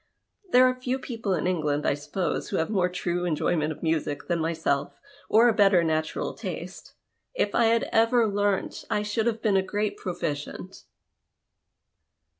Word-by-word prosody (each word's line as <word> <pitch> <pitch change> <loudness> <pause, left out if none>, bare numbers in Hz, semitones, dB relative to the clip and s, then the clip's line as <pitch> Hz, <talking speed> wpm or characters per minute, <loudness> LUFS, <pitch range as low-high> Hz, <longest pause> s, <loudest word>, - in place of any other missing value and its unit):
There 255 +1 +7
are 255 - +2
few 255 0 -3
people 225 -7 -3
in 165 - -2
England, 150 -5 0
I - - +3
suppose, 150 +5 -3
who - - -1
have 165 +6 -1
more 185 -4 +2
true 180 -1 -2
enjoyment 155 -2 0
of 155 - -9
music 160 -3 -1
than 170 -1 0
myself, 160 -3 -1 0.3
or 230 +3 +6
a 235 - +4
better 195 -4 +4
natural 160 -1 -1
taste. - - -7 0.4
If - - 0
I 235 - +3
had 230 0 +3
ever 230 +1 +4
learnt, 205 -1 -1
I 210 - 0
should 210 +2 -1
have 225 -1 -2
been 205 -4 +3
a - - +4
great 205 +2 -2
proficient." 155 -5 -5
185 Hz, 165 wpm, -26 LUFS, 160-220 Hz, 0.4 s, There